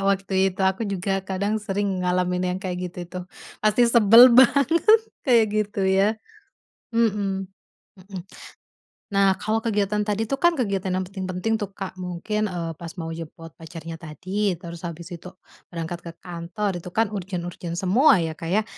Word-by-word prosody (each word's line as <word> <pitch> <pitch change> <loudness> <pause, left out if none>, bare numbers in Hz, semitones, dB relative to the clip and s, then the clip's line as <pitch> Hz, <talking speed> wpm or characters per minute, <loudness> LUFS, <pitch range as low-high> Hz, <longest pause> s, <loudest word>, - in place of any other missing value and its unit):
Kakak, 195 - +1
waktu 195 0 0 0.2
itu, 190 +1 -8
aku 190 +3 +1
juga 195 +1 -1
kadang 200 +3 -2
sering 200 -2 -2
ngalamin 180 0 0
yang 180 +1 -2
kayak 185 -2 -3
gitu 180 - -13
itu, 180 +1 -7 0.4
pasti 215 +3 +4
sebel 235 +1 +8
banget 280 - +5 0.3
kayak 235 -5 +5
gitu 210 -1 -1
ya. 195 +3 +3 0.8
Mhm 200 -4 0 0.4
Mhm. 190 -1 -10 0.9
Nah, 195 -1 +4
kalau 220 +1 0
kegiatan 210 -2 0
tadi 210 +1 0
tuh 275 - 0
kan 345 +3 +4
kegiatan 195 - -1
yang 185 - 0
penting-penting 190 +3 -2
tuh 200 -2 -5
Kak, 190 -1 -7
mungkin 185 +4 -2
eee, 175 -4 -4
pas 170 -1 -8
mau 165 0 -4
jemput 165 0 -8
pacarnya 165 0 -8
tadi, 185 +5 -2
terus 170 0 -8
habis 170 0 -8
itu 180 +1 -9 0.4
berangkat 170 0 -4
ke - - -5
kantor 180 +4 -3
itu 175 - -13
kan 225 -2 +2
urgent-urgent 175 -3 -5
semua 195 - +4
ya 160 -1 -4
Kak, 165 - -6
ya, 215 +3 +3
190 Hz, 165 wpm, -24 LUFS, 180-210 Hz, 0.9 s, sebel